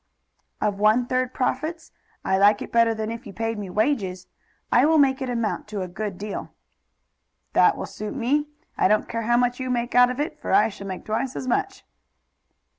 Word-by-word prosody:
"Of 200 -1 -1
one 215 +4 +4
third 255 0 0
profits? 310 +6 -2 0.3
I 190 - +2
like 205 +1 +4
it - - -10
better 230 -1 +3
than 220 0 -3
if 230 -1 -7
you 200 - -9
paid 225 0 -3
me 200 -2 -6
wages. 195 -4 -1 0.5
I 245 - +5
will 315 +2 +4
make 275 -1 +3
it 260 - -2
amount 230 -4 -2
to 210 -3 -4
a - - -5
good 195 +1 -5
deal." 205 +1 -5 1.0
"That - - +4
will - - -4
suit 215 +4 -7
me. 280 +4 +1 0.3
I - - +5
don't 210 +2 +2
care 230 -1 -3
how 240 - +4
much 245 +1 +1
you 255 0 -3
make 240 -1 -1
out 245 0 +6
of 250 +2 -4
it, 295 - -3
for - - -2
I 390 - +5
shall 200 -1 -9
make 185 -1 -6
twice 225 +4 -2
as 255 - -5
much." 390 +10 -1
230 Hz, 205 wpm, -24 LUFS, 210-255 Hz, 1.0 s, out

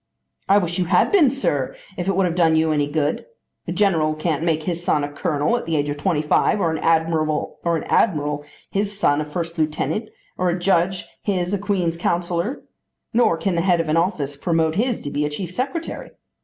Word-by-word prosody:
"I 200 - +6
wish 175 -2 0
you 180 - +1
had 180 +1 +3
been, 350 -10 +6
sir, 150 - -1 0.2
if 180 0 -4
it 195 - +1
would 190 0 +3
have 175 - 0
done 165 -2 +3
you 160 0 +2
any 145 -2 +1
good. 150 - -1 0.4
A - - -2
general 160 -7 +2
can't 155 -1 -1
make 160 -2 +1
his 175 0 -3
son 150 -4 +1
a 145 - -3
colonel 145 +7 0
at 240 - -6
the 165 - 0
age 145 0 0
of 145 - -4
twenty 155 0 0
five, 180 +7 +2
or 170 -4 +1
an - - -3
admiral 160 -1 +1 0.3
his 200 0 -1
son 150 -7 +2
a - - -3
first 165 +2 -4
lieutenant, 155 +8 -1 0.3
or 180 0 +2
a 175 - 0
judge 180 0 +1 0.2
his 185 -2 -1
a 200 - 0
Queen's 185 -5 -1
Counsellor, 175 - -1 0.5
nor 225 -8 +3
can 190 +3 -1
the 170 - +1
head 175 -1 +3
of 165 -1 -1
an 155 - +2
office 160 -5 0
promote 160 +1 +1
his 235 +6 0
to 145 - -5
be 145 - 0
a 150 - 0
chief 170 +4 -5
secretary. 275 - -4
170 Hz, 210 wpm, -22 LUFS, 155-190 Hz, 0.5 s, I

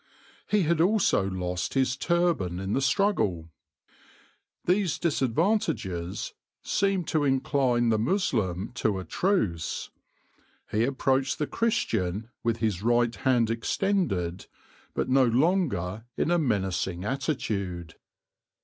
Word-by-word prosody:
He 210 -2 +2
had 165 0 +2
also 185 - +3
lost 90 +2 -3
his 130 -2 +2
turban 165 - 0
in 95 +2 -3
the 135 - +1
struggle. 105 - +1 1.1
These 180 -1 +2
disadvantages 135 - -1 0.3
seemed 195 -4 0
to 155 -2 +1
incline 135 -3 +2
the 110 -1 +2
Moslem 110 - 0
to 105 -3 +1
a 95 - -5
truce: 110 - -1 0.8
he 110 +2 +2
approached 135 0 +1
the 150 - 0
Christian 110 - -1
with 115 -1 0
his 105 -5 -1
right 120 +1 +2
hand 120 -4 +2
extended, 115 - -1 0.5
but - - 0
no 130 0 +4
longer 120 - +1
in 170 - +1
a 175 - +3
menacing 95 - -1
attitude. 100 - -2
120 Hz, 115 wpm, -27 LUFS, -, 1.1 s, no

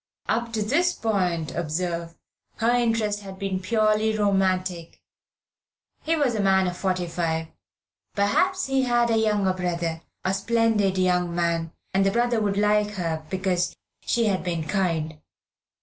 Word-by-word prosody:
Up 235 +1 -1
to 215 -1 0
this 340 +11 +2
point, 180 - -1
observe, 170 +1 -3 0.4
her 230 +1 +1
interest 225 -4 +1
had 195 -2 -9
been 195 -1 -2
purely 215 +2 +1
romantic. 185 -4 0 1.0
He 325 +1 +1
was 285 -6 +1
a 220 - -2
man 190 -1 +3
of 180 -1 -2
forty 185 -1 -1
five. 165 -1 -2 0.7
Perhaps 365 - +2
he 270 0 +1
had 240 -2 +2
a 225 - +3
younger 210 -4 +2
brother, 170 -3 -2 0.2
a 190 - +1
splendid 210 -2 +1
young 180 -2 +1
man, 170 -1 0 0.2
and 195 +1 +3
the 195 - +3
brother 235 +2 +1
would 200 -1 0
like 210 0 +2
her 165 -4 -2
because 185 -2 -1 0.3
she 235 -1 +1
had 195 -3 0
been 170 -3 -2
kind. 160 -5 -1
195 Hz, 150 wpm, -25 LUFS, 175-220 Hz, 1.0 s, man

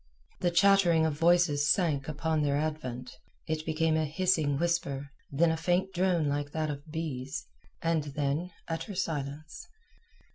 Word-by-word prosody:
The 175 - +2
chattering 175 -2 +4
of 160 - +1
voices 165 -2 +3
sank 150 -7 +2
upon 155 +1 -1
their 145 -1 +1
advent, 130 -5 -3 0.3
it 155 0 -2
became 160 0 +1
a 160 0 +1
hissing 155 -3 +1
whisper, 145 -4 -1 0.2
then 160 +4 +3
a 160 - -1
faint 180 +3 0
drone 175 -4 +1
like 145 0 -2
that 155 -1 -1
of 145 +2 -8
bees, 145 -5 -4 0.4
and 165 -2 +1
then 145 +4 -2 0.2
utter 170 +5 -4
silence. 155 -3 -4
155 Hz, 145 wpm, -29 LUFS, 145-170 Hz, 0.4 s, chattering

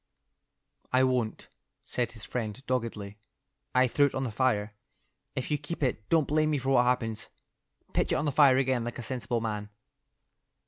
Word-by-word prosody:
"I 130 +1 +4
won't," 125 -4 0 0.4
said 120 -1 -1
his 110 -2 -5
friend, 115 -2 -3
doggedly. 110 -5 -3 0.6
"I 130 0 +6
threw 140 +3 +3
it - - -6
on 130 - -1
the 125 - -2
fire. 105 -3 +1 0.6
If 130 +2 -3
you 150 - +1
keep 150 +1 -5
it, 115 -5 -1
don't 160 -4 +3
blame 155 +1 +2
me 150 - +1
for 135 0 -1
what 125 -2 +5
happens. 115 -3 0 0.6
Pitch - - +1
it - - +3
on - - 0
the 145 - +1
fire 135 -2 +6
again 130 -2 +1
like 120 0 -5
a 120 - -5
sensible 120 -1 -2
man." 105 -2 -3
125 Hz, 180 wpm, -29 LUFS, 115-135 Hz, 0.6 s, I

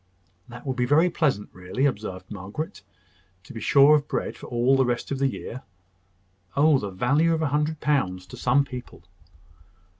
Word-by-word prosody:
"That 120 +4 -11
will 135 - -1
be 125 -1 -1
very 160 +6 +4
pleasant, 135 -12 0
really," 90 +9 -2
observed 100 -7 -3
Margaret. 100 +10 -6 0.6
"To - - -12
be 115 - -7
sure 140 +6 +6
of 150 -1 +2
bread - - -3
for - - -11
all 120 +2 +2
the 135 - +4
rest 120 +1 -2
of 135 - -2
the 135 - +3
year! 130 -1 -6 1.0
Oh, 145 -1 +5
the 105 - -4
value 145 - +2
of 160 - -2
a 150 - +1
hundred 150 +2 0
pounds 95 -12 0
to - - -11
some 135 +3 +2
people!" 125 -9 -9
130 Hz, 180 wpm, -25 LUFS, 110-145 Hz, 1.0 s, sure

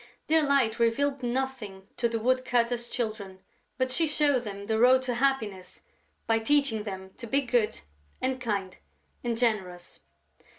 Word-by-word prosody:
Dear 320 +1 +4
Light 270 -6 +2
revealed 270 +4 +1
nothing 240 -6 -3
to 235 - +1
the 230 - -1
woodcutter's 245 0 +1
Children, 215 -5 -4 0.4
but 255 -1 0
she 325 +5 +2
showed 290 -4 +2
them 200 -1 -6
the 220 +1 0
road 255 +2 +6
to 250 -1 -1
happiness 225 -8 -1 0.4
by 225 0 +2
teaching 230 -3 +1
them 190 -2 -6
to 235 - -8
be 275 +5 +2
good 235 - 0 0.4
and 260 0 -1
kind 200 -6 -2 0.5
and 235 -2 -1
generous. 190 -7 -2
235 Hz, 145 wpm, -28 LUFS, 215-260 Hz, 0.5 s, road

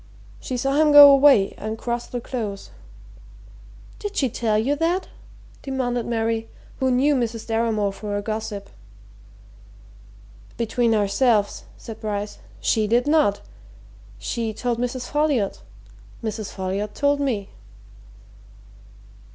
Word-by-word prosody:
She 255 - -4
saw 275 +3 0
him 305 -1 +4
go 290 -1 +11
away 275 -8 +5
and 220 +1 -4
cross 240 +1 -3
the 245 - -4
Close." 220 -5 -5 1.3
"Did 415 -1 -6
she 265 - +2
tell 220 -2 0
you 260 +7 +1
that?" 345 +4 0 0.5
demanded 245 -4 -2
Mary, 225 -1 -1 0.3
who 265 - +1
knew 265 +4 +3
Mrs. 235 -4 -2
Deramore 225 -3 0
for 205 0 -4
a - - -2
gossip. 210 -2 -5 1.9
"Between 230 0 +1
ourselves," 210 +1 +1
said 225 -2 -9
Bryce, 205 -1 -4 0.2
"she 220 -2 +1
did 240 +3 +2
not! 295 -10 +2 0.8
She 225 -2 -3
told 240 0 -2
Mrs. 245 +1 -3
Folliot 295 -9 0 0.6
Mrs. 215 -2 -4
Folliot 195 +2 -4
told 285 0 +1
me." 235 -8 -2
230 Hz, 120 wpm, -23 LUFS, 215-265 Hz, 1.9 s, go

